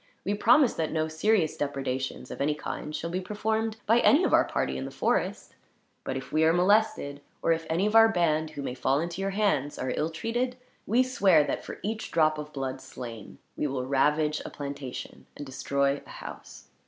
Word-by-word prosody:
We 200 - +1
promise 240 +5 +5
that 160 -1 -2
no 155 0 0
serious 160 +1 +1
depredations, 135 -2 -3
of - - -6
any 150 +1 +1
kind, 150 0 -5
shall 170 - -4
be 185 +2 -2
performed 220 +3 -2
by 230 +3 +4
any 290 +8 +5
of - - +1
our - - +6
party - - -1
in - - -4
the - - -5
forest; - - -1 0.5
but 130 - -3
if 135 - -8
we 155 +1 +2
are 160 - +5
molested, 180 -6 +2 0.2
or - - +3
if 165 0 0
any 170 +5 +1
of 210 +1 0
our 225 0 +8
band 160 -5 +1
who 145 -2 -7
may 125 - -3
fall 130 +2 +1
into 170 +3 -3
your 195 - 0
hands 195 -9 0
are 130 - -2
ill 155 - 0
treated, 235 +10 -2 0.3
we 240 +5 +4
swear 195 -11 +4
that, - - -3
for - - -7
each 220 +2 -3
drop 155 -2 +2
of 150 0 -7
blood 135 -2 -4
slain, 115 -4 -9 0.2
we - - -1
will 130 -2 -3
ravage 150 +3 +2
a - - -6
plantation 140 -3 -7
and 145 - -6
destroy 140 +1 0
a - - -15
house. - - -10
160 Hz, 205 wpm, -28 LUFS, 140-205 Hz, 0.5 s, our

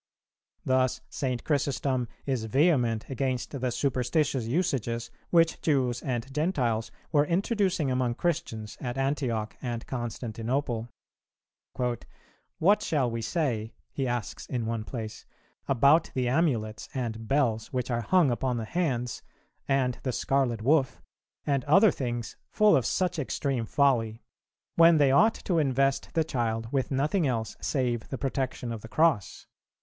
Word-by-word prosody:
Thus 130 -1 +2
St. 130 -3 -2
Chrysostom 140 -3 0 0.2
is 130 -5 -1
vehement 125 -3 +2
against 130 -2 -2
the 130 -3 -2
superstitious 130 0 0
usages 120 - -1 0.2
which 165 -1 +3
Jews 130 -6 +1
and 125 +1 -3
Gentiles 130 -8 0 0.2
were 145 0 +3
introducing 185 - +1
among 125 -2 0
Christians 110 -11 -3
at 120 0 -4
Antioch 130 -6 -1
and 120 -2 -4
Constantinople. 120 0 -3 0.9
"What 125 - -1
shall 135 -6 0
we 115 0 -3
say," 115 -4 -2 0.2
he 135 -2 -2
asks 120 -2 -4
in 120 -3 -2
one 115 -1 -2
place, 110 -3 -7 0.4
"about 140 +5 +4
the 125 -1 +1
amulets 125 -7 0
and 115 -3 -3
bells 120 -6 +1
which 125 -1 -2
are 120 0 0
hung 170 0 +3
upon 125 +1 -1
the 115 - -3
hands, 125 -6 -1 0.5
and 130 -2 +1
the 130 - -1
scarlet 125 -4 0
woof, 130 -1 +2 0.5
and 140 -3 +1
other 195 +7 +6
things 120 -4 -4
full 215 -1 +4
of 130 - +2
such 180 -3 0
extreme 135 -4 -2
folly; 115 -6 +1 0.5
when 165 0 +7
they 140 -3 +4
ought 220 +11 +5
to 175 -4 0
invest 135 -1 +1
the 165 - +3
child 115 -5 -2
with 135 -2 0
nothing 150 +5 +1
else 115 -4 -2
save 120 -4 -1
the 135 - -3
protection 130 -3 -2
of 115 -2 -5
the 115 - -9
Cross? 155 - +1
130 Hz, 140 wpm, -28 LUFS, 115-145 Hz, 0.9 s, when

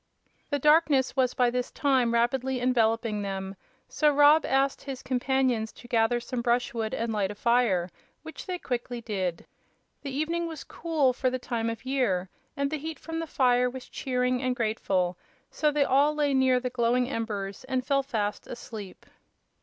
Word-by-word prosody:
The 285 - +1
darkness 300 -2 +3
was 255 -2 +1
by 245 -1 +3
this 250 0 -2
time 260 -5 +2
rapidly 250 +2 +1
enveloping 230 -3 +1
them, 195 -1 -4 0.3
so 300 - +2
Rob 295 +2 +5
asked 270 +1 +1
his 270 -2 -6
companions 255 -3 0
to 240 - -14
gather 240 0 +2
some 240 0 -4
brushwood 235 -2 0
and 230 0 -2
light 200 -3 0
a 205 - -6
fire, 230 -6 +2 0.4
which 320 +4 -9
they 365 -1 -2
quickly 245 -5 -4
did. 190 -7 -3 0.6
The 285 - -5
evening 330 +5 -1
was 320 -3 -7
cool 310 -6 0
for 255 +1 0
the 255 - -2
time 230 -2 -2
of 230 +3 -6
year, 225 -9 0 0.3
and 280 0 0
the 310 - -2
heat 315 +1 -5
from 325 +2 -5
the 330 - -4
fire 250 -3 +3
was 255 0 -9
cheering 250 -1 -1
and 255 -1 0
grateful; 195 -6 -1 0.3
so 305 - +1
they 295 -1 +2
all 285 +3 +3
lay 290 -2 +1
near 260 -1 +4
the 250 0 -4
glowing 245 0 +1
embers 215 -3 -4
and 255 -1 -2
fell 275 -1 +2
fast 215 -6 -3
asleep. 220 -5 -9
250 Hz, 175 wpm, -27 LUFS, 230-275 Hz, 0.6 s, Rob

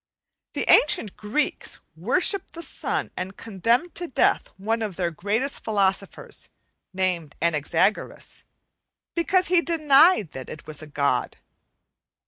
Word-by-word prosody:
The - - -2
ancient 225 -8 +5
Greeks 215 +8 -2 0.2
worshipped 395 - +1
the 335 - -5
sun, - - -2
and 190 +1 -6
condemned 230 - 0
to 350 - -5
death 270 - +1
one 225 +4 -1
of 210 -5 -3
their 175 -1 -1
greatest 210 - -2
philosophers, 195 -2 -2 0.4
named 180 -5 -2
Anaxagoras, 170 +5 0 0.7
because 365 +1 +1
he 355 -1 +4
denied 310 - +4
that 130 -1 -8
it 150 - -9
was 155 -1 -4
a 155 - -9
god. 140 -1 -1
210 Hz, 120 wpm, -24 LUFS, -, 0.7 s, ancient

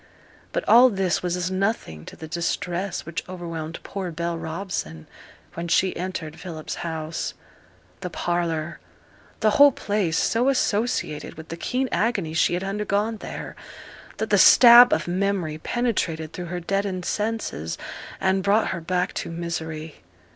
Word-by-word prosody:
But - - -3
all 250 +2 +8
this 190 -5 0
was 180 -1 -1
as 180 +1 -2
nothing 190 - -2
to - - -10
the 160 - -9
distress 175 +2 -2
which 170 0 -4
overwhelmed 165 -3 -5
poor 195 -2 -4
Bell 170 +1 -3
Robson 160 - -5 0.5
when 170 +1 -5
she 185 +2 +2
entered 170 -3 -5
Philip's 160 -3 -6
house; 160 -1 -4 0.6
the 180 - -5
parlour 170 -2 -2 0.6
the 215 -1 +4
whole 285 +5 +7
place 205 -8 -1
so 240 +4 +2
associated 225 - -1
with 160 0 -11
the 165 - -4
keen 255 +9 -1
agony 200 -8 0
she 160 +2 +2
had 180 - -3
undergone 210 +2 -1
there, - - -7 0.6
that - - -3
the - - +5
stab 245 0 +9
of - - +1
memory 180 -4 -1
penetrated 165 -8 -1
through 180 - -5
her 175 +1 -4
deadened 190 0 -2
senses, 210 - -2 0.4
and 190 0 +2
brought 205 +3 +2
her 175 - -3
back 180 +2 -1
to - - -4
misery. 160 -2 -5
180 Hz, 145 wpm, -24 LUFS, 165-200 Hz, 0.6 s, stab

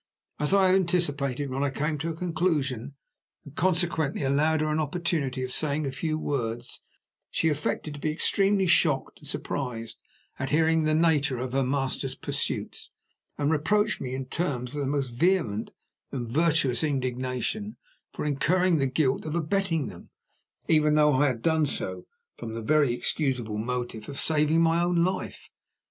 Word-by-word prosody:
As 150 0 +1
I 195 -1 +5
had - - +4
anticipated, 145 -7 0
when 135 +1 -2
I 145 - +2
came 150 +2 -2
to 165 +4 -2
a 165 - -4
conclusion, 150 -7 -1 0.5
and 145 0 -12
consequently 165 -5 +1
allowed 150 +3 +2
her 155 0 0
an 155 - +1
opportunity 150 -4 -1
of 130 - -4
saying 150 +2 0
a 135 - -2
few 155 +3 -2
words, 120 -5 -3 0.5
she 160 - +1
affected 150 0 -2
to 145 - -8
be 155 - -1
extremely 195 +5 +2
shocked 160 -6 +2
and 150 - -13
surprised 125 -5 -4 0.4
at 130 - -2
hearing 160 +2 +3
of 155 - +1
the 155 - +2
nature 150 -5 +2
of 125 +1 -4
her 135 - +2
master's 135 0 -1
pursuits, - - -3 0.5
and 145 +1 +1
reproached 210 +8 +1
me 130 -1 -3
in 135 0 -4
terms 130 -4 -2
of 145 - -3
the 140 - -1
most 140 -2 -1
vehement 120 - +1 0.4
and 120 -4 -4
virtuous 155 -3 +2
indignation 130 - -2 0.3
for - - -5
incurring 170 +5 +2
the 135 -2 +1
guilt 130 0 +1
of 155 0 -4
abetting 170 -2 0
them, 90 -6 -10 0.6
even 150 -1 +4
though 150 -1 +5
I 140 +3 +4
had 120 -4 -2
done 160 -2 +3
so - - -2 0.3
from 115 -1 -6
the 115 - -5
very 145 0 +3
excusable 120 -4 -1
motive 120 -1 -4
of 140 +1 -6
saving 155 +1 +2
my 165 +1 +3
own 175 -1 +2
life. 185 +1 -3
150 Hz, 170 wpm, -27 LUFS, 130-165 Hz, 0.6 s, I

